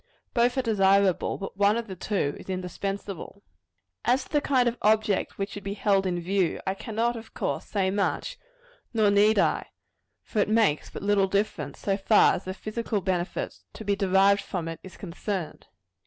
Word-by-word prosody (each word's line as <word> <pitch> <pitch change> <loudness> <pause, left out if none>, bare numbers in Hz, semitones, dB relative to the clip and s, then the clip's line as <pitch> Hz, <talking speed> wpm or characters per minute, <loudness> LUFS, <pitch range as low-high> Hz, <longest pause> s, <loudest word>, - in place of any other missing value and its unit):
Both 245 +2 +2
are 260 - +2
desirable; 195 -4 +3
but 195 - -7
one 205 +2 +4
of 235 - -3
the 190 -4 -7
two 180 -6 -1
is - - -12
indispensable. 195 +2 -5 0.6
As 250 +3 +2
to - - -18
the 295 -2 +2
kind 255 -4 +2
of 240 +1 -1
object 215 -1 +2
which 195 +1 -3
should 205 - -7
be 200 0 -4
held 195 -2 +2
in 175 -1 -1
view, 185 0 0
I 190 - 0
cannot, 225 +4 -1
of 225 -1 -10
course, - - -2
say 190 -2 0
much; 210 - -1 0.6
nor 215 -2 +4
need 210 +2 +4
I - - +2 0.6
for 215 - -3
it 205 - +2
makes 215 -9 +2
but - - -8
little 200 -1 +3
difference, 190 -7 -1
so 195 -1 -1
far 210 +2 +5
as - - -4
the 185 0 -4
physical 215 +1 -3
benefit 180 -1 -2
to 220 - -9
be 200 0 +2
derived 195 +1 +4
from 175 -3 -4
it 165 -1 -5
is 190 - -12
concerned. 185 -1 -5
200 Hz, 185 wpm, -27 LUFS, 190-215 Hz, 0.6 s, far